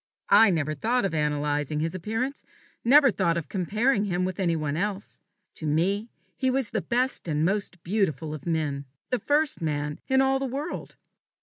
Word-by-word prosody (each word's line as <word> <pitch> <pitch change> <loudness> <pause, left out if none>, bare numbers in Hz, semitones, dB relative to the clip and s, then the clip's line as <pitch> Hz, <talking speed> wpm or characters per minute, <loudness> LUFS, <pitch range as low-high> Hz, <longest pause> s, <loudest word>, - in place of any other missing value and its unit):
I 225 - +8
never 155 -4 0
thought 230 - 0
of 190 - -1
analyzing 150 -1 0
his 160 +1 -1
appearance, 225 +9 -3 0.4
never 275 +2 +6
thought 170 -4 +1
of 160 -5 -4
comparing 210 - +1
him 180 -2 0
with 185 0 -4
any 170 -3 +1
one 150 -2 -2
else. 200 +3 -3 0.4
To 155 - -4
me 195 +9 +1 0.3
he 260 - 0
was 255 -3 0
the - - -1
best 250 -3 0
and 155 0 +1
most 190 -2 -2
beautiful 165 -5 -1
of 155 +1 -8
men 150 -4 -1 0.3
the 250 - +1
first 295 - +1
man 150 -2 -2
in 265 0 +3
all 270 0 +3
the 270 - -2
world. 280 +6 -5
185 Hz, 180 wpm, -26 LUFS, 155-240 Hz, 0.4 s, I